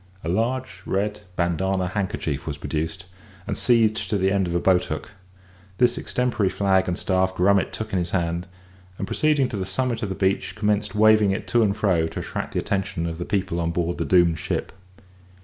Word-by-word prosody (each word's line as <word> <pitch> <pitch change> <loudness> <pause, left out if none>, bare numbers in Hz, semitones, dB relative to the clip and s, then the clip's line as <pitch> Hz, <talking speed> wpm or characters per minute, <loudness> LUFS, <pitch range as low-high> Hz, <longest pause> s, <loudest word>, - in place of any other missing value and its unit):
A 80 - -3
large 120 +7 -1
red 105 +2 -1
bandana 90 +2 0
handkerchief 95 -8 -3
was 75 -2 -3
produced 80 +5 -3 0.4
and - - -2
seized 110 -4 +2
to 105 - +1
the 95 0 +2
end 95 -2 +1
of 85 - -2
a - - +3
boat 90 0 +3
hook; - - -5 0.7
this 120 -1 +3
extempore 125 -6 0
flag 95 0 +2
and 90 0 -1
staff 95 0 +1
Grummet 95 +2 +3
took 110 -1 -6
in 95 - +2
his 85 0 -2
hand, 85 -1 -1 0.5
and, - - -3
proceeding 150 +2 +2
to 105 - -4
the 95 - -2
summit 120 +4 -1
of 105 - -2
the 95 - -3
beach, 95 -1 0
commenced 105 -1 0
waving 110 -1 +5
it 95 - -2
to 120 - +3
and 105 -1 +2
fro, 85 -6 +2
to - - -6
attract - - -5
the - - 0
attention 95 -3 -2
of 85 0 -4
the 85 - -3
people 95 -4 -1
on 85 -1 0
board 85 0 -1
the - - 0
doomed 85 -3 +4
ship. - - -3
95 Hz, 200 wpm, -24 LUFS, 85-105 Hz, 0.7 s, waving